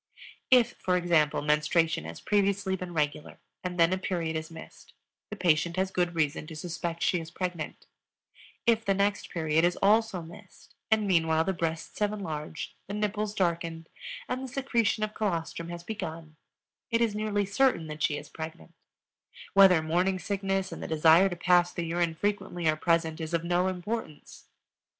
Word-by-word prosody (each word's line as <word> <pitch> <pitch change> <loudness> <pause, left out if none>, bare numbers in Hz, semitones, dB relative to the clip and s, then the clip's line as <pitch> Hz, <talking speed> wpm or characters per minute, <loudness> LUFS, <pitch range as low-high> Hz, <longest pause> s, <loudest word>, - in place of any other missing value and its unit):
_If, 245 -2 +5
for 180 -1 +1
example, 165 -5 +2
menstruation 150 - +2
has 80 +1 -7
previously 200 -1 +1
been 185 -1 -6
regular 150 -2 -2 0.3
and 180 -1 -4
then 165 +2 +5
a 185 - -1
period 170 -4 -2
is 160 0 -4
missed, 160 -1 -13 0.4
the 210 - -5
patient 170 -2 +2
has 190 0 0
good 175 -2 0
reason 155 -1 0
to 160 - -8
suspect 170 +1 -4
she 180 - +2
is 160 -1 -8
pregnant; 180 -2 -5 0.8
if 225 -1 +3
the 195 -3 +1
next 200 +1 0
period 160 -1 +1
is 175 0 +2
also 210 -3 +3
missed 175 +4 -15 0.2
and 220 -1 +3
meanwhile 160 -4 +3
the 190 - -1
breasts 165 -2 -3
have 210 -1 +2
enlarged, 160 -6 -5
the 200 - -4
nipples 210 0 -2
darkened, 165 -2 -1 0.4
and 255 +1 -2
the 265 - -5
secretion 235 -5 0
of 215 0 -2
colostrum 170 -5 -2
has 170 0 -7
begun, 165 -6 -6 0.5
it 230 -2 +2
is 230 -3 +2
nearly 210 -1 0
certain 200 -3 +2
that 155 0 -7
she 150 - +1
is - - -8
pregnant; 160 +1 -8 0.8
whether 190 -5 +7
morning 180 +4 +1
sickness 195 0 -2
and - - -7
the - - -4
desire 160 +4 +5
to 175 - -4
pass 175 0 +3
the 170 - -4
urine 170 0 0
frequently 190 -2 -2
are 155 - +4
present 165 0 0
is 160 +1 -2
of 165 - -1
no 175 +1 +1
importance. 185 -3 -5
175 Hz, 175 wpm, -28 LUFS, 160-200 Hz, 0.8 s, whether